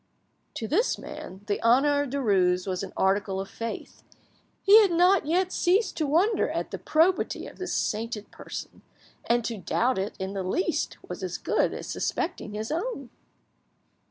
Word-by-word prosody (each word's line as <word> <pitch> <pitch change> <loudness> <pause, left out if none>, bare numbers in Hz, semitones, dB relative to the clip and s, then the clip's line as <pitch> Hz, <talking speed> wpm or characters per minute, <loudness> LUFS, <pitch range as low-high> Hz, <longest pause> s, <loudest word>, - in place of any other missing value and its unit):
To 220 - -3
this 415 - +1
man, 190 +2 -9
the 205 -2 -1
honour 280 +5 +4
of 285 - -3
Derues 190 -9 +2
was 185 -2 -2
an 195 -1 -6
article 195 0 +1
of 195 - -4
faith; 230 0 -6 0.6
he 420 +3 +9
had 405 - +4
not 355 0 +4
yet 365 +3 +1
ceased 375 +3 +2
to 310 - 0
wonder 350 +10 +2
at - - -3
the - - -5
probity 335 +4 +1
of - - -12
this 370 -1 -3
sainted 220 -1 -2
person, - - -8 0.4
and 235 -1 +2
to 230 -3 -3
doubt 240 +3 +1
it 195 +3 -3
in 190 +1 -4
the 195 - -2
least 305 - -1
was - - -6
as - - -3
good - - +1
as - - -6
suspecting 210 - -3
his 215 +4 -4
own. 325 - -3
245 Hz, 170 wpm, -27 LUFS, -, 0.6 s, he